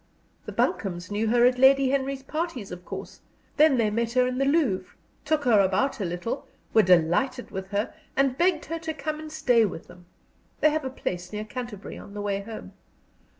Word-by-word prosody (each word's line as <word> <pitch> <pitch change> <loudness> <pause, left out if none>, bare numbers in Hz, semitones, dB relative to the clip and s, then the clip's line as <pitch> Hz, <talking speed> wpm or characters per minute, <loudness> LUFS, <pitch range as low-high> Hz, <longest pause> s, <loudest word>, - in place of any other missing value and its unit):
The - - -4
Buncombes 185 -2 -1
knew 210 +2 0
her 240 +2 +4
at 250 0 +3
Lady 265 0 +6
Henry's 275 0 -1
parties, 305 - -4
of 180 0 -8
course. - - -8 0.4
Then 300 -3 +6
they 220 -3 +2
met 230 +2 -1
her 250 0 +4
in 255 +1 -2
the 275 - +2
Louvre, 275 - +1 0.3
took 305 -1 +1
her 235 -6 +5
about 195 +9 +1
a 200 - -1
little, 180 +10 -4 0.3
were 220 - +7
delighted 185 +9 +2
with 190 -1 -5
her, 205 +4 -2 0.2
and 270 -2 +2
begged 340 0 +2
her 330 +1 -4
to 320 -1 -4
come 305 +1 -4
and 310 0 -8
stay 250 -7 +3
with 185 -6 -3
them 175 0 -16 0.5
they 305 - +4
have 310 -2 -1
a - - -1
place 180 -8 -5
near 210 0 -4
Canterbury 235 -3 -7
on 200 - -12
the 205 - -4
way 200 -1 -1
home. 220 +2 -9
245 Hz, 200 wpm, -26 LUFS, 200-275 Hz, 0.5 s, were